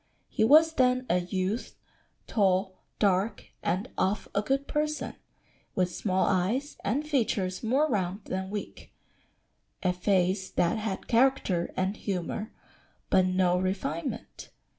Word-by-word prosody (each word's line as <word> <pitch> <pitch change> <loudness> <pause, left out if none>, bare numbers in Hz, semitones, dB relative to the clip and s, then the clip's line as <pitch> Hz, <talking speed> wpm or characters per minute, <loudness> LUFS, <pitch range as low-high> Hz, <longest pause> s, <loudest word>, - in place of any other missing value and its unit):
He - - 0
was 315 +7 +6
then 255 -2 +2
a 180 - +3
youth, 185 +5 -2 0.5
tall, 190 -2 +2 0.2
dark, 200 +1 +1
and 185 +7 -1
of 195 +3 0
a 200 - +2
good 270 +5 -1
person, 300 0 -1 0.6
with 180 -1 +1
small 190 -2 +1
eyes, 210 +10 0
and 275 +10 -1
features 210 -10 0
more 265 +7 +2
round 195 - -1
than 190 0 -3
weak; 205 0 -7 0.9
a 180 -1 +2
face 190 +1 +1
that 175 +5 +1
had 215 -3 -3
character 235 -8 +2
and 190 +2 0
humour, 200 +3 -3 0.6
but 185 -1 +5
no 185 -1 +2
refinement." 185 -3 -3
195 Hz, 125 wpm, -28 LUFS, 185-240 Hz, 0.9 s, was